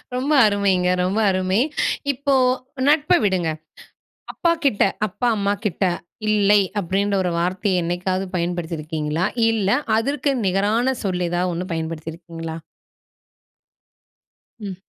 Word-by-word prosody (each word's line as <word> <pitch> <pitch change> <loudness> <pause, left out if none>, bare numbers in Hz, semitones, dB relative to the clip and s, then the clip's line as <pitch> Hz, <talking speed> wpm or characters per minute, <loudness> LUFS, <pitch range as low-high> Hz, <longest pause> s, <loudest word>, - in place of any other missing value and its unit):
ரொம்ப 265 +4 -1
அருமைங்க, 195 -3 +2
ரொம்ப 190 +4 0
அருமை! 185 +2 +1 0.5
இப்போ 280 +1 -1 0.5
நட்ப 300 +3 +3
விடுங்க. 185 -5 +1 0.8
அப்பா 340 - +1
கிட்ட 240 -7 +3 0.2
அப்பா, 245 +5 -2
அம்மா 200 0 +1
கிட்ட, 200 -1 -1 0.5
"இல்லை" 210 -1 +4 0.2
அப்படீன்ற 200 +2 0
1 180 - -1
வார்த்தைய 185 +1 0
என்னைக்காவது 185 +2 -1
பயன்படுத்தி 175 -1 -2
இருக்கீங்களா? 155 +2 -2 0.3
இல்ல, 210 -4 0 0.3
அதற்கு 280 +5 0
நிகரான 210 +7 +1
சொல் 180 -3 -1
எதாவது 175 +1 0
1 175 +2 -3
பயன்படுத்தி 160 0 -4
இருக்கீங்களா? 165 -1 -7 2.0
ம். 200 -3 -6
185 Hz, 115 wpm, -21 LUFS, 175-210 Hz, 2.0 s, இல்லை